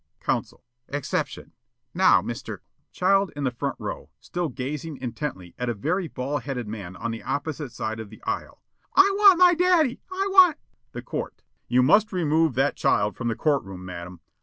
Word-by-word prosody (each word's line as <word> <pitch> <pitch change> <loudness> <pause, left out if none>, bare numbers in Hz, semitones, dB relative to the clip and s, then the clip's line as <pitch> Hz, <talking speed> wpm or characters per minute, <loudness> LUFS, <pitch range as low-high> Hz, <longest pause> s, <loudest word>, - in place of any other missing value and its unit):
Counsel: - - -3 0.2
"Exception. 145 -1 -3 0.4
Now, - - +5
Mr. - - -6
" - - -47
Child 195 +1 +2
in 145 - -4
the 130 - +1
front 120 - -3
row, - - -6
still 175 -2 -3
gazing 145 +4 -5
intently 120 - -5
at 125 0 -1
a 120 - -1
very 170 - -1
baldheaded 135 -1 -3
man 100 -4 -7
on 115 +5 -4
the 115 - -6
opposite 145 -2 -3
side 110 0 -4
of 110 -2 -7
the 110 - -15
aisle: - - -4 0.3
"I 395 +1 +7
want 400 -3 +7
my 360 0 +7
daddy! 345 -7 +2
I 385 +1 -1
want 370 -4 +7 0.2
" - - -47
The - - -6
Court: - - -5 0.2
"You 125 +1 +3
must 210 +11 +4
remove 160 - +1
that 135 +3 +2
child 105 +1 +1
from 120 - -4
the 115 - 0
court 145 -3 +1
room, 95 -1 -9
madam. 90 0 -8
145 Hz, 185 wpm, -25 LUFS, 115-190 Hz, 0.4 s, I